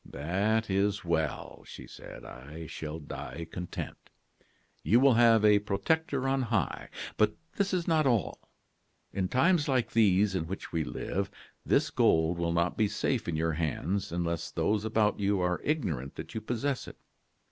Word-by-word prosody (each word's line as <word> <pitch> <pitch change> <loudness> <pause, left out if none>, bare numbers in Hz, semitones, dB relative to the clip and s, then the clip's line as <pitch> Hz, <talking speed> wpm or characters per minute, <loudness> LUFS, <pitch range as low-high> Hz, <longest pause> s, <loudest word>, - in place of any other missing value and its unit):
"'That 100 +10 0
is 100 0 0
well,' 80 -2 -2
she - - -10
said; - - -11
'I 75 +6 -9
shall 75 +1 -6
die 80 +1 -7
content. 90 -1 -6 0.7
You 115 - +4
will 135 0 +6
have 115 -2 +5
a 105 -1 +6
protector 135 +8 0
on 135 0 +1
high. 110 - -1 0.3
But 105 0 +3 0.2
this 200 -1 +1
is 180 -3 -1
not 155 -4 +3
all. 115 -7 +1 0.7
In 95 -2 0
times 150 - +3
like 130 -4 +1
these 105 -2 +4
in 85 -4 -2
which 95 +3 -6
we 80 -2 0
live, 100 +5 -3 0.3
this - - +2
gold 80 +2 +3
will 85 0 0
not 85 +1 +1
be 110 - +3
safe - - -1
in 85 - -1
your 80 +1 0
hands 85 +5 -2
unless 85 -1 -2
those 105 0 0
about 110 -1 +1
you 100 -1 +1
are 90 0 0
ignorant 80 - -2
that - - -8
you 110 - -3
possess 125 +4 -2
it. - - -10
100 Hz, 165 wpm, -30 LUFS, 85-115 Hz, 0.7 s, will